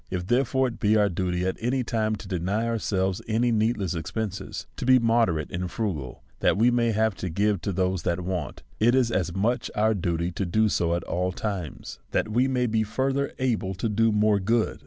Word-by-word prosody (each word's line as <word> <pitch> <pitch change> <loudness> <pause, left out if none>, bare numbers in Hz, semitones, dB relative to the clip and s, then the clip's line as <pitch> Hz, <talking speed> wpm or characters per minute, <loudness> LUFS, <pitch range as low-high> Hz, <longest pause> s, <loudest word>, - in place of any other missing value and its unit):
If, 90 -1 -3
therefore, 130 +3 +2
it 115 - -10
be 110 0 +3
our 105 -1 +3
duty 90 0 -1
at 95 - -1
any 125 +2 0
time 110 -2 0
to 105 -1 -10
deny 95 +5 -1
our 115 -1 -1
selves 95 -2 -1
any 115 +2 +2
needless 110 -4 +1
expenses, 100 +4 -4
to - - -4
be 130 0 +7
moderate 115 -10 +1
and 90 +1 -3
fru 105 +1 -1
gal, 65 -5 -8 0.2
that - - +2
we 120 +3 +4
may 120 -1 +2
have 110 0 +1
to 95 - -4
give 100 +2 +1
to 100 - -2
those 95 -1 0
that 85 +1 -1
want, 90 -7 -4 0.2
it 120 +3 +4
is 125 -3 +2
as 90 -5 -1
much 115 +6 0
our 110 +1 +3
duty 85 -2 -1
to 95 - -3
do 110 +5 +2
so 85 -3 +1
at 85 - -3
all 90 +1 -1
times, 95 -4 -5
that - - +1
we 120 +4 +2
may 125 -2 +1
be 110 -1 +1
further 135 +5 -1
able 110 -7 -1
to 95 - -2
do 110 +1 +2
more 105 -1 +3
good. 115 +3 0
105 Hz, 220 wpm, -26 LUFS, 90-115 Hz, 0.2 s, be